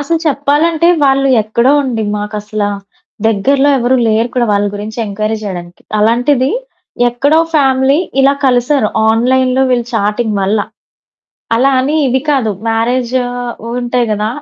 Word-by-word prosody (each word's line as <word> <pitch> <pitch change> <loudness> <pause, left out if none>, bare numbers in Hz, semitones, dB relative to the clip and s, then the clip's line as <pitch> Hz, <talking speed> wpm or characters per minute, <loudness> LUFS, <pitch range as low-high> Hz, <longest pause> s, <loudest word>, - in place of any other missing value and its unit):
అసలు 330 +3 -1
చెప్పాలంటే 310 +3 +1 0.2
వాళ్ళు 275 0 +2
ఎక్కడో 235 +5 +1
అండి. 230 -4 -2
మాకసల 210 0 -4 0.6
దగ్గరలో 265 +7 +2
ఎవరు 250 +1 +1
లేరు 220 +2 +1
కూడా 245 -2 +1
వాళ్ళ 205 0 +1
గురించి 215 +3 -7
ఎంక్వైరీ 215 +2 -2
చేయడానికి. 175 -4 -7 0.2
అలాంటిది. 245 +5 +2 0.6
ఎక్కడో 285 +6 +1 0.2
ఫ్యామిలీ 270 -1 +3 0.2
ఇలా 270 +1 +4
కలిసారు 245 -1 +2 0.2
ఆన్లైన్‌లో 255 +3 +2
వీళ్ళు 240 -2 0
చాటింగ్ 210 +1 -1
వల్ల. 200 +3 +1 1.0
అలా 260 +4 +3
అని 285 +4 -1
ఇవి 260 +1 +1
కాదు. 260 -6 +1 0.2
మ్యారేజ్ 235 +2 0 0.7
ఉంటాయి 245 0 -1
కదా! 210 +1 -1
245 Hz, 125 wpm, -13 LUFS, 215-270 Hz, 1.0 s, ఇలా